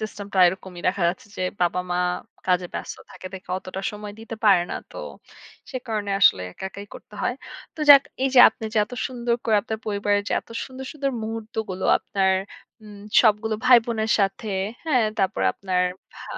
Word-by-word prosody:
সিস্টেমটা 205 -2 -5
এরকমই। 180 -1 -3
দেখা 190 -1 -1
যাচ্ছে 185 +3 -5
যে - - -3 0.2
বাবা-মা 180 0 0 0.5
কাজে 180 -1 +2
ব্যস্ত - - -5 0.2
থাকে 185 - -10
দেখে 190 0 -10
অতটা 190 +1 -7
সময় 210 0 -8
দিতে 225 0 -7
পারে 180 -4 +6
না। - - -3 0.2
তো - - -12 0.7
সে 260 - -4
কারণে 210 -2 -2
আসলে 95 - +5
একা, - - -9
একাই 200 +2 -9
করতে 210 - -13
হয়। 245 - 0 0.4
তো 315 - -10
যাক 280 -1 +10 0.2
এইযে 265 -1 +3
আপনি 225 - -10
যে - - +3
এতো 250 +3 -10
সুন্দর 240 -2 -1
করে 220 -2 +3
আপনার 220 -1 -4
পরিবারের 205 0 +1
যে - - -2
এতো - - -15
সুন্দর, 265 0 -9
সুন্দর 280 -2 -2
মুহূর্তগুলো 220 -3 -5
আপনার 190 -2 +1 0.5
উম 205 -1 -12 0.2
সবগুলো 220 -1 +2
ভাই-বোনের 230 -3 +4
সাথে। 195 +3 -1 0.4
হ্যাঁ? 255 -8 +3
তারপরে 195 0 +1
আপনার 185 -2 0 0.3
ভা - - -11
210 Hz, 170 wpm, -24 LUFS, 190-225 Hz, 0.7 s, যাক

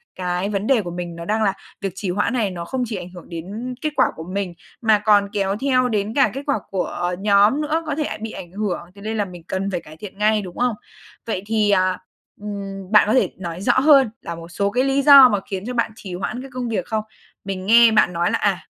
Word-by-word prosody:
cái 180 +2 -2
vấn 205 +1 -2
đề 255 -5 +4
của 175 - -6
mình 175 -1 -5
nó 170 - -7
đang 215 +3 0
là 195 -2 +2 0.3
việc 195 - -2
trì 195 -1 -4
hoãn 205 +6 0
này 215 -6 0
nó 170 -1 -6
không 255 +6 -2
chỉ 220 -2 -5
ảnh 180 -1 -6
hưởng 180 -1 -13
đến 205 +10 -6
kết 305 - 0
quả - - +4
của 160 - -7
mình, 185 0 -4 0.3
mà 220 -2 +4
còn 205 -1 +3
kéo 195 -1 0
theo 255 -2 +2
đến 210 0 -1
cả 275 - +4
kết 275 +2 -5
quả 280 -7 0
của 180 -1 -2
nhóm 205 +7 +4
nữa, 320 +2 -1
có 295 -2 -2
thể 305 - -1
ả 215 - -4
bị 225 - -5
ảnh 175 - -9
hưởng. 205 -1 -2 0.2
Thế 200 - -13
nên 220 +1 -3
là 205 - +1
mình 180 -3 -11
cần 195 +1 -2
phải 175 -2 -2
cải 155 +1 -14
thiện 195 +2 -10
ngay, 215 0 +2
đúng 180 -3 -9
không? 245 -2 +1 0.5
Vậy 205 -4 -3
thì, 215 -1 +1
à, 185 -1 +2 0.4
ừm, 195 -2 -6
bạn 210 -1 +6
có 215 - +2
thể 260 - +3
nói 175 -1 -6
rõ 240 +3 +3
hơn 275 -4 +6
là 170 - -6
một 165 0 -10
số 200 +3 -1
cái 250 +3 +1
lý 275 +1 +2
do 275 -2 +9
mà 205 - +1
khiến 195 +1 -4
cho 250 - -4
bạn 235 -2 0
trì 190 -4 -9
hoãn 245 +7 -4
cái 270 - -9
công 250 -1 -3
việc 200 -6 -2
không? 220 -1 -2 0.4
Mình 190 -1 -4
nghe 230 +2 +7
bạn 215 -4 +3
nói 170 +1 0
là, - - +1
à, 195 -3 +1
205 Hz, 265 wpm, -21 LUFS, 185-235 Hz, 0.5 s, do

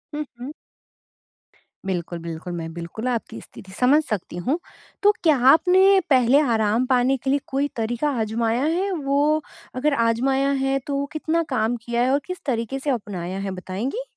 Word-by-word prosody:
हुँ, 300 - -2 0.2
हुँ। 255 +4 -6 1.3
बिल्कुल, 175 -2 -3
बिल्कुल। 170 +1 -6
मैं 165 -1 -5
बिल्कुल 170 +8 -6
आपकी 230 -2 -3
स्थिति 190 - -13
समझ 280 +5 +4
सकती 195 -5 -4
हूँ। 305 +6 +1 0.4
तो 415 - +7
क्या 310 -4 +4
आपने 375 +4 +5
पहले 260 0 +5
आराम 230 -3 +2
पाने 255 +1 +2
के 265 - -1
लिए 280 - +3
कोई 275 +2 0
तरीक़ा 240 +5 -1
आज़माया 225 +3 0
है? 360 +6 0
वो 295 -1 +1 0.3
अगर 280 +3 +1
आज़माया 265 +4 +1
है 270 0 +1
तो 280 0 -1
कितना 320 +2 0
काम 235 -2 0
किया 235 0 0
है? 250 - +2
और 280 - +3
किस 365 -1 -6
तरीके 255 0 -2
से 290 - -3
अपनाया 190 -7 -3
है 195 0 -3
बताएँगी? 195 - -4
255 Hz, 165 wpm, -23 LUFS, 220-290 Hz, 1.3 s, तो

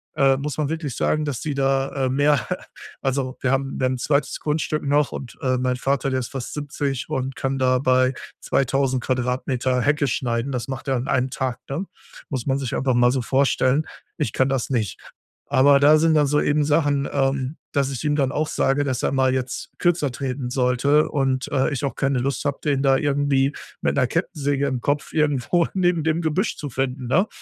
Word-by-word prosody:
Äh, 135 -1 +4
muss 145 0 -4
man 150 -2 0
wirklich 155 -5 -3
sagen, 155 - +1
dass 145 -5 -3
die 150 - -2
da, 135 0 +1 0.2
äh, - - -1
mehr 145 -3 +2 0.6
also, 135 -1 -1
wir 130 - +1
haben, 135 0 -1
dann 130 0 +1
'n - - -5
2. 140 0 0
Grundstück 150 0 -1
noch 145 0 +2
und, 125 - -7
äh, 130 -1 +1
mein 125 0 0
Vater, 135 +1 0
der 130 - +1
ist 125 - -4
fast 135 -3 -5
70 145 -2 -3
und 130 0 -2
kann 135 0 -1
da 130 0 +3
bei 130 0 +3 0.3
2.000 135 -1 +1
Quadratmeter 125 0 0
Hecke 145 0 +2
schneiden. 120 +1 -1
Das 125 -3 -3
macht 130 +1 -5
er 135 - +2
an 125 - -4
einem 130 0 +1
Tag, 130 -3 -2
ne? 155 +8 -3 0.4
Muss 130 -5 -3
man 135 0 +1
sich 130 -3 -3
aber 130 -1 +1
mal 120 0 +4
so 130 -1 0
vorstellen. 135 +2 +2 0.3
Ich 150 - -2
kann 130 0 +2
das 135 -3 -1
nicht. 115 -7 -1 0.5
Aber 140 +1 +5
da 150 +2 +7
sind 165 0 +3
dann 150 -2 +4
so 150 +1 +2
eben 150 0 +2
Sachen, 145 -2 +1
ähm, 135 +1 0 0.2
dass 140 -2 +1
ich 135 - -5
ihm 145 -1 +2
dann 135 -3 +1
auch 155 +1 -1
sage, 145 0 +1
dass 130 -3 -2
er - - +1
mal 130 -1 +2
jetzt 130 -1 -3
kürzer 170 -5 +2
treten 130 -1 -4
sollte 130 +4 +2
und, 135 -2 0
äh, 135 +2 +1
ich 140 - -3
auch 135 - -3
keine 135 -1 0
Lust 135 +3 -2
habe, 140 -1 -1
den 140 -3 +1
da 135 -1 +4
irgendwie 140 -1 +1 0.3
mit - - 0
'ner 125 - +3
Kettensäge 145 -3 -1
im 130 -2 -1
Kopf 145 +3 -1
irgendwo 150 +2 +1
neben 175 -4 +1
dem 160 +1 +1
Gebüsch 170 +6 0
zu 145 - -5
finden, 130 0 -3
ne? 185 - +3
135 Hz, 210 wpm, -23 LUFS, 130-145 Hz, 0.6 s, da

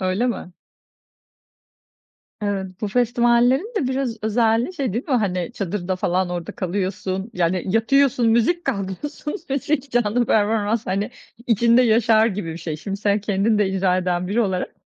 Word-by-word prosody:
Öyle 185 +6 0
mi? 225 -7 -4 1.9
Evet. 200 -2 -2
Bu 210 - -2
festivallerin 245 - +2
de 280 -11 0
biraz 260 -3 -2
özelliği 225 - +1
şey 265 - -2
değil 235 +5 -2
mi? 270 - +2
Hani, 190 -5 0
çadırda 190 -3 -3
falan 180 0 0
orada 175 -1 -4
kalıyorsun, 190 +2 -3
yani 180 -1 0
yatıyorsun 235 +4 +3
müzik, 235 +10 +2
kalkıyorsun 205 - -4 0.2
müzik, 280 0 -1
canlı 240 0 +1
performans, 215 +1 +1
hani, 195 +3 -1 0.4
içinde 235 +2 +4
yaşar 225 -1 +4
gibi 195 -6 -3
bir 160 - -8
şey. 160 -3 -4
Şimdi 195 +5 -5
sen 205 0 +1
kendin 205 +2 +1
de 205 -2 +2
icra 190 -1 +1
eden 180 -1 -1
biri 215 +5 +1
olarak 190 -5 -1
215 Hz, 150 wpm, -22 LUFS, 190-240 Hz, 1.9 s, içinde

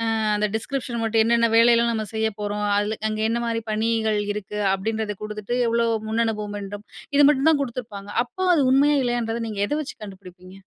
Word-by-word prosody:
அ - - 0 0.2
அந்த 210 0 +1
டிஸ்க்ரிப்ஷன் 240 0 -3
மட்டும் 225 0 +3
என்னென்ன 230 0 +3
வேலைலாம் 235 0 +5
நம்ம 220 -1 -2
செய்ய 220 0 +1
போறோம். 205 0 -2
அதில 210 +1 -1
அங்க 215 0 -3
என்ன 235 +1 0
மாதிரி 230 -1 -1
பணிகள் 220 0 0
இருக்கு 210 0 -6 0.2
அப்படின்றத 215 +2 -2
கொடுத்துட்டு 210 +2 -4
எவ்ளோ 235 0 +1 0.2
முன்னனுபவம் 220 -2 -1
வேண்டும் 205 +1 -8 0.3
இது 290 - +7
மட்டும் 290 +1 +3
தான் 295 -3 +1
குடுத்துருப்பாங்க. 220 -6 -7
அப்போ 370 +10 -6
அது 295 - +3
உண்மையா 285 +2 +4
இல்லையன்றத 235 -1 -1
நீங்க 205 -2 -4
எதை 295 - -1
வச்சு 290 - -8
கண்டுபுடிப்பீங்க? 185 -2 -12
220 Hz, 180 wpm, -23 LUFS, 210-235 Hz, 0.3 s, இது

